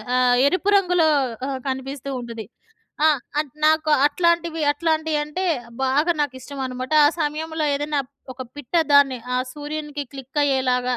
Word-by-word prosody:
ఆహ్, 250 -1 +4
ఎరుపు 370 +6 0
రంగులో 360 -4 +3 0.4
ఆ! - - -3 0.2
కనిపిస్తూ 270 +1 -4
ఉంటది. 230 -2 -7 0.6
ఆ! - - +7 0.3
అట్ 295 -4 -6
నాకు 315 0 +3 0.2
అట్లాంటివి 335 +1 +1
అట్లాంటివి 315 -1 0
అంటే 300 +6 -4 0.4
బాగా 285 +6 +2
నాకిష్టం 275 -1 -4
అనమాట. 255 +2 -5
ఆ - - +7
సమయంలో 315 +1 -2
ఏదైనా 290 0 -1 0.3
ఒక 255 +1 -7
పిట్ట 290 +1 -11 0.2
దాన్ని, 280 -3 +5 0.2
ఆ - - +2 0.2
సూర్యునికి 295 0 -5
క్లిక్ 270 +2 -4
అయ్యేలాగా. 255 -2 +1
290 Hz, 135 wpm, -22 LUFS, 260-315 Hz, 0.6 s, ఆ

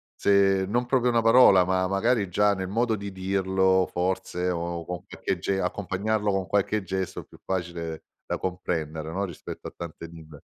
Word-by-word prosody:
se 95 -1 +3
non 120 +4 0
proprio 125 -1 +2
una 115 -1 +2
parola, 115 -6 +7
ma 95 0 +1
magari 100 +1 +1
già 105 +3 +3
nel 95 -1 -4
modo 115 +2 +1
di 100 -1 -6
dirlo 95 0 +1
forse 90 0 -1
o 85 -1 -3
con 90 -1 -5
qualche - - -3
ge 95 -1 -1
accompagnarlo 100 +3 -1
con 95 -1 -1
qualche 100 +1 0
gesto 95 0 -3
è - - -17
più - - -18
facile 85 -3 -4 0.2
da - - -1
comprendere, 80 -4 -3
no, 100 +3 -1
rispetto 85 - -8
a - - -24
tante 85 -1 -8
lingue. 80 -3 -13
95 Hz, 175 wpm, -26 LUFS, 90-100 Hz, 0.2 s, parola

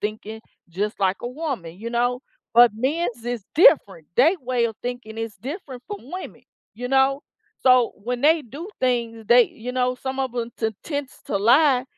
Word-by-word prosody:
thinking, 215 +1 -5 0.3
just 205 +5 -3
like 190 0 +2
a 240 - -3
woman, 250 - -5
you 230 +2 -6
know, 245 +1 0 0.3
but 240 0 +8
men's 250 -1 -2
is 240 -3 -3
different. 200 - +5
They 315 +10 +5
way 250 -2 0
of 225 -2 -7
thinking 245 -3 -6
is 225 -2 -4
different 270 -3 -7
from 205 - -5
women, 370 +1 -7 0.3
you 245 +3 -5
know? 270 +2 +3 0.4
So 255 -2 +5
when 240 +4 -4
they 310 +2 +4
do 285 - -9
things, 235 -3 -1
they 240 +2 +7
you 245 +3 -7
know, 250 0 +1
some 265 +1 -4
of 260 -2 -2
'em 235 -1 -2
to 220 -1 0
tends 285 -3 -5
to 200 - -1
lie 250 +5 +4
245 Hz, 180 wpm, -23 LUFS, 225-265 Hz, 0.4 s, but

